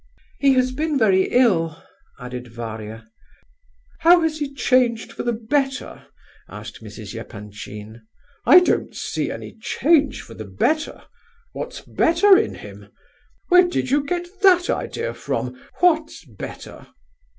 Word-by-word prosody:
"He 275 Hz, -1 st, +4 dB
has 255 Hz, 0 st, +2 dB
been 300 Hz, +2 st, -1 dB
very 195 Hz, -6 st, +4 dB
ill," 170 Hz, -11 st, +2 dB, 0.4 s
added 125 Hz, -1 st, -7 dB
Varia. 110 Hz, -1 st, -8 dB, 0.9 s
"How 345 Hz, +2 st, +6 dB
has 315 Hz, -1 st, -1 dB
he 290 Hz, -2 st, -3 dB
changed 250 Hz, -4 st, +1 dB
for -, -, -5 dB
the 240 Hz, -, 0 dB
better?" 270 Hz, +4 st, -2 dB, 0.4 s
asked -, -, -10 dB
Mrs. -, -, -9 dB
Epanchin. 105 Hz, +2 st, -9 dB, 0.4 s
"I 360 Hz, -, +8 dB
don't 360 Hz, -, 0 dB
see -, -, -3 dB
any -, -, -8 dB
change 290 Hz, +5 st, +2 dB
for 115 Hz, -, -12 dB
the 110 Hz, -, -8 dB
better! 305 Hz, -, -1 dB, 0.5 s
What's -, -, -6 dB
better 380 Hz, +5 st, +4 dB
in 425 Hz, +3 st, +1 dB
him? -, -, -12 dB, 0.6 s
Where 360 Hz, 0 st, +6 dB
did 305 Hz, -7 st, -2 dB
you 285 Hz, +1 st, +3 dB
get 350 Hz, +4 st, -2 dB, 0.2 s
that 365 Hz, -3 st, +5 dB
idea 470 Hz, +2 st, -3 dB
from? -, -, -4 dB, 0.3 s
what's 320 Hz, -, +2 dB
better?" 110 Hz, -8 st, -10 dB
260 Hz, 130 wpm, -22 LUFS, -, 0.9 s, I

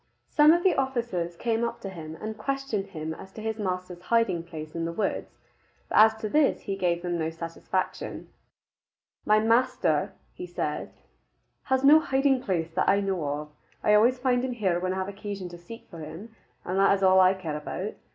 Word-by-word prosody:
Some 300 Hz, +1 st, +6 dB
of 345 Hz, +1 st, +3 dB
the 375 Hz, -, +4 dB
officers 235 Hz, -11 st, -2 dB
came 230 Hz, +4 st, -1 dB
up 235 Hz, -, -2 dB
to 195 Hz, -, -5 dB
him 160 Hz, -3 st, -8 dB
and 220 Hz, 0 st, -5 dB
questioned 250 Hz, -3 st, -2 dB
him 160 Hz, -4 st, -5 dB
as 190 Hz, +4 st, -11 dB
to 220 Hz, -, -8 dB
his 220 Hz, 0 st, -3 dB
master's 180 Hz, -2 st, -3 dB
hiding 230 Hz, -4 st, +1 dB
place 155 Hz, -2 st, -9 dB
in 165 Hz, -1 st, -2 dB
the 165 Hz, -, -2 dB
woods. 195 Hz, +3 st, -3 dB, 0.5 s
But -, -, +3 dB
as 220 Hz, +1 st, +7 dB
to 215 Hz, -, -1 dB
this 295 Hz, +6 st, +2 dB
he 195 Hz, -, -3 dB
gave 175 Hz, -2 st, 0 dB
them 175 Hz, -1 st, -2 dB
no 160 Hz, 0 st, 0 dB
satisfaction. 165 Hz, +3 st, -4 dB, 1.0 s
"My 215 Hz, 0 st, +5 dB
master," 215 Hz, -, +2 dB, 0.2 s
he 180 Hz, -, -7 dB
said, 155 Hz, -4 st, -3 dB, 0.8 s
"has 265 Hz, 0 st, +1 dB
no 295 Hz, +3 st, +8 dB
hiding 270 Hz, -3 st, +2 dB
place 170 Hz, -8 st, -2 dB
that 185 Hz, +3 st, +1 dB
I 200 Hz, -, +4 dB
know 195 Hz, -4 st, -1 dB
of. 145 Hz, +1 st, -3 dB, 0.3 s
I 210 Hz, -, +4 dB
always 235 Hz, +5 st, +5 dB
find 250 Hz, -1 st, +1 dB
him 260 Hz, -1 st, -2 dB
here 190 Hz, -7 st, 0 dB
when 185 Hz, +1 st, -1 dB
I -, -, -4 dB
have 190 Hz, 0 st, -2 dB
occasion 200 Hz, -2 st, -6 dB
to 175 Hz, -, -10 dB
seek 230 Hz, +7 st, -11 dB
for 170 Hz, -, -9 dB
him, 190 Hz, +9 st, -9 dB, 0.3 s
and 185 Hz, +2 st, -1 dB
that 195 Hz, 0 st, +5 dB
is 195 Hz, -, -4 dB
all 190 Hz, 0 st, +6 dB
I 185 Hz, +1 st, +5 dB
care 165 Hz, -5 st, -4 dB
about. 185 Hz, +7 st, -5 dB
195 Hz, 200 wpm, -27 LUFS, 170-230 Hz, 1.0 s, no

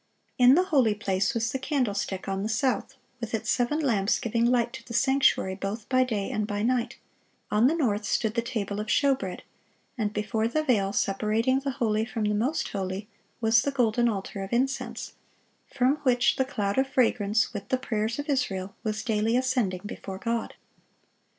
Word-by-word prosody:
In 250 Hz, +2 st, +7 dB
the 360 Hz, -, +4 dB
holy 265 Hz, -, +2 dB
place 195 Hz, -1 st, 0 dB
was 230 Hz, +1 st, 0 dB
the 265 Hz, -, -2 dB
candlestick, 210 Hz, -9 st, -2 dB
on 195 Hz, 0 st, -2 dB
the 210 Hz, -, -2 dB
south, 240 Hz, +3 st, 0 dB, 0.2 s
with 230 Hz, -1 st, -3 dB
its 220 Hz, -, -1 dB
seven 250 Hz, +4 st, +1 dB
lamps 220 Hz, -9 st, +2 dB
giving 230 Hz, -1 st, 0 dB
light 240 Hz, -1 st, +2 dB
to 245 Hz, -3 st, -8 dB
the 235 Hz, -1 st, -7 dB
sanctuary 265 Hz, -8 st, +3 dB
both 200 Hz, +3 st, -5 dB
by 255 Hz, 0 st, +4 dB
day 215 Hz, -6 st, -2 dB
and 215 Hz, -1 st, -1 dB
by 205 Hz, 0 st, -2 dB
night; 245 Hz, +1 st, 0 dB, 0.5 s
on 215 Hz, +4 st, +4 dB
the 315 Hz, -, +2 dB
north 220 Hz, -10 st, 0 dB
stood 215 Hz, +1 st, 0 dB
the 235 Hz, -, +1 dB
table 210 Hz, -4 st, -3 dB
of 210 Hz, -, -4 dB
showbread; 265 Hz, -11 st, +1 dB, 0.6 s
and 210 Hz, -2 st, 0 dB
before 215 Hz, +1 st, -1 dB
the 310 Hz, +6 st, 0 dB
veil 210 Hz, -9 st, +2 dB
separating 215 Hz, +6 st, +1 dB
the 275 Hz, 0 st, -3 dB
holy 215 Hz, -2 st, +1 dB
from 225 Hz, -1 st, -3 dB
the 210 Hz, 0 st, +1 dB
most 245 Hz, +10 st, 0 dB
holy 195 Hz, +1 st, -4 dB, 0.3 s
was 225 Hz, 0 st, +4 dB
the 280 Hz, -, -1 dB
golden 240 Hz, -3 st, +2 dB
altar 195 Hz, -1 st, -4 dB
of 195 Hz, -, -6 dB
incense, 260 Hz, +3 st, -1 dB, 0.6 s
from 260 Hz, +3 st, +2 dB
which 250 Hz, -4 st, +2 dB
the 265 Hz, -, +2 dB
cloud 205 Hz, -4 st, -1 dB
of 265 Hz, -, +2 dB
fragrance, 225 Hz, -5 st, +1 dB
with 205 Hz, -2 st, -6 dB
the 260 Hz, -, +2 dB
prayers 220 Hz, -2 st, -2 dB
of 290 Hz, +1 st, -4 dB
Israel, 200 Hz, -10 st, -1 dB
was 215 Hz, -1 st, -2 dB
daily 225 Hz, +1 st, +1 dB
ascending 250 Hz, -8 st, 0 dB
before 195 Hz, -2 st, -6 dB
God. 230 Hz, +2 st, -3 dB
230 Hz, 185 wpm, -27 LUFS, 205-255 Hz, 0.6 s, In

